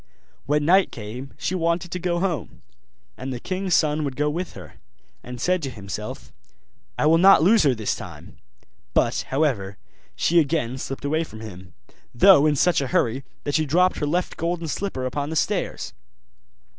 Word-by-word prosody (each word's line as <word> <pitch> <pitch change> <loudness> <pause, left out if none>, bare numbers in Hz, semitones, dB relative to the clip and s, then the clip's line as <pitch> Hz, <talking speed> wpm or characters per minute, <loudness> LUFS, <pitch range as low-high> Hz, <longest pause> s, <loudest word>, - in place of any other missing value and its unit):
When 145 +1 +1
night 190 +4 +4
came 120 +5 -8
she - - -2
wanted 170 0 -1
to 180 - -3
go 175 0 -1
home; 175 -5 -3 0.5
and 135 - -5
the 125 - -4
king's 185 +4 -1
son 155 -1 +2
would 140 -3 -3
go 150 +2 0
with 175 +3 -4
her, 90 -6 -12 0.4
and 125 0 -8
said 180 +7 +1
to 140 - -3
himself, 100 -6 -7 0.6
'I - - +1
will 160 +2 +5
not 195 -2 +7
lose 215 +5 +5
her 140 -5 +3
this 110 -2 -2
time'; - - -11 0.6
but, - - +1
however, 125 -9 -1 0.4
she 165 - +3
again 140 -5 0
slipped 135 +1 -6
away 155 +3 +1
from 110 -8 -11
him, 95 -4 -11 0.4
though 155 +2 +7
in 150 - +2
such 175 +2 +3
a 135 - -2
hurry 120 +2 0 0.2
that 145 - -3
she 155 0 +1
dropped 180 +5 +2
her 150 - -1
left 175 +4 -1
golden 170 0 -2
slipper 155 -6 -3
upon 140 +3 -3
the 160 - -4
stairs. - - -1
150 Hz, 180 wpm, -23 LUFS, 130-175 Hz, 0.6 s, not